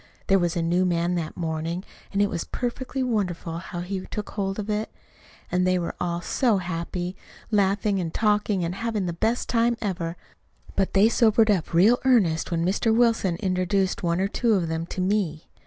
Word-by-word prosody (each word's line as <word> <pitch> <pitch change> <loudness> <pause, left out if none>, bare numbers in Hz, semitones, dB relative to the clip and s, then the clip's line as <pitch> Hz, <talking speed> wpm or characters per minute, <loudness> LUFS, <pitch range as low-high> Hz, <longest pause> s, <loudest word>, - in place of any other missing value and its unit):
There 195 0 +4
was 175 0 0
a 170 - 0
new 175 +2 +2
man 175 -1 +1
that 165 -3 -3
morning, 165 +1 -3 0.3
and 200 0 +2
it 205 - +1
was 170 - -2
perfectly 260 +2 -3
wonderful 180 -8 -2
how 175 -1 -6
he 185 +1 -4
took 210 -2 -5
hold 195 -2 -2
of 210 -1 -4
it. 215 +1 -1 0.6
And 180 0 +2
they 185 0 +3
were 170 -1 -2
all 175 -1 -1
so 230 +4 +2
happy, 175 0 -4 0.4
laughing 200 0 +2
and 170 -3 -2
talking, 210 -3 +1
and 170 - -2
having 215 -1 -2
the 175 - -2
best 225 +8 0
time 235 0 +2
ever; 175 -5 -3 0.6
but 195 -1 0
they 200 +2 +6
sobered 225 -1 +4
up 185 -5 0
real 205 +9 +5
earnest 205 -12 +3
when 170 -1 0
Mr. 205 +5 +1
Wilson 225 -6 +3
introduced 190 0 0
one 170 -1 0
or 195 - +2
two 225 +2 +1
of 175 -4 0
them 160 +1 -2
to 185 - -4
me. 185 -5 -1
190 Hz, 190 wpm, -25 LUFS, 175-210 Hz, 0.6 s, they